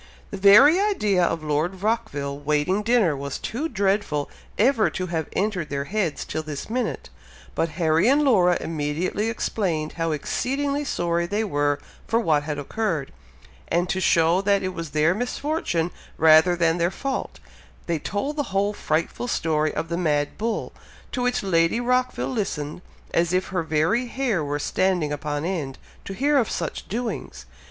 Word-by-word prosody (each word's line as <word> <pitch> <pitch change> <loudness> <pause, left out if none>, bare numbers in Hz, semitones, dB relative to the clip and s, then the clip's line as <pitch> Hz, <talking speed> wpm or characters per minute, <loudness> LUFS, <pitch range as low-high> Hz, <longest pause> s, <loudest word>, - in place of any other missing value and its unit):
The 200 - -4
very 215 - +7
idea 215 - +2
of 165 -2 0
Lord 155 +6 -1
Rockville 145 -11 -1
waiting 150 +7 +1
dinner 215 -8 +3
was 140 0 -4
too 290 +8 -3
dreadful 195 - 0 0.3
ever 230 0 +3
to 185 - -3
have 165 -3 -2
entered 195 -5 -1
their 140 0 -2
heads 180 0 -2
till 155 - -3
this 150 +4 -7
minute; 250 +1 -2 0.4
but 165 - 0
Harry 165 +2 +3
and 290 +2 +4
Laura 185 -10 +4
immediately 165 +7 -2
explained 175 -9 -1
how 165 -1 -1
exceedingly 280 - -1
sorry 170 -6 0
they 205 +4 0
were 145 -7 +1 0.3
for 230 - +2
what 155 -9 +2
had 150 0 -4
occurred, 160 -1 -2 0.6
and 175 +1 +1
to 190 - 0
show 170 +1 +3
that 200 0 +2
it 185 0 -2
was 165 -2 -5
their 155 +3 +2
misfortune 245 - -1 0.3
rather 160 +2 +6
than 170 0 +1
their 170 +1 +2
fault, 270 +7 -4 0.5
they 170 -2 -1
told 275 - -3
the - - +2
whole 200 +2 +1
frightful 165 +7 -2
story 155 -8 0
of 165 - -4
the 170 - -1
mad 150 -4 0
bull, 225 +1 -3 0.4
to 250 - -2
which 250 -2 0
Lady 165 +2 +2
Rockville 250 +1 0
listened, 180 - -3 0.3
as 170 +1 +2
if 185 +1 0
her 180 -2 -1
very 165 +10 +1
hair 235 - -1
were 145 0 -2
standing 175 0 0
upon 145 +1 -3
end, 155 -8 -3 0.3
to 195 - -5
hear 285 +4 +3
of 230 - 0
such 165 -3 -4
doings. 225 - -4
180 Hz, 165 wpm, -24 LUFS, 155-220 Hz, 0.6 s, very